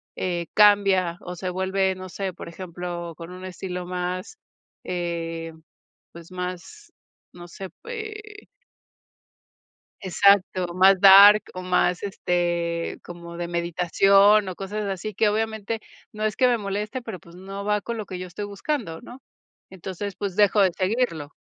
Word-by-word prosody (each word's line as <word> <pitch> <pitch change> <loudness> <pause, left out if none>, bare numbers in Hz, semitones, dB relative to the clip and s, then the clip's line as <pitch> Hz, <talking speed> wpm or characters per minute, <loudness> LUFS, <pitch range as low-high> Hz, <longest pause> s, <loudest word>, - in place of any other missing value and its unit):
eh, 175 -2 -2
cambia 195 -4 +4
o 180 0 -8
se 185 +1 -4
vuelve, 190 +1 0
no 185 0 -8
sé, 190 +1 -4
por - - -10
ejemplo, 175 -1 -6
con 170 +1 -9
un 185 0 -10
estilo 180 -1 -6
más, 180 - -4 0.5
eh, 165 -2 -4 0.6
pues 170 +1 -13
más, 180 - -7 0.4
no 175 -1 -11
sé, 190 +2 -8 0.2
eh 430 -2 -8 1.5
exacto 190 -2 +3
más 190 +1 +5
dark 200 +2 +9
o 185 - -6
más, 180 -1 +1
este, 175 -3 -1
como 170 -1 -10
de 170 0 -4
meditación 190 +4 +3
o 185 - -4
cosas 205 +3 -5
así, 195 +2 -4
que 210 +3 +2
obviamente 220 +1 -2 0.3
no 215 0 -4
es 215 -1 -1
que 255 - +4
me 245 -1 +3
moleste, 210 +4 -4
pero 225 -5 -7
pues, 170 +1 -17
no 195 +2 -7
va 210 0 +1
con 235 +3 -5
lo 215 -2 -5
que 185 - -6
yo 185 - -6
estoy 180 +4 -6
buscando, 205 - -4
¿no?, 245 +2 -12 0.5
entonces, 190 +2 -6
pues, 200 -3 -4
dejo 205 0 +4
de 185 - +3
seguirlo. 185 - -1
190 Hz, 150 wpm, -24 LUFS, 175-205 Hz, 1.5 s, dark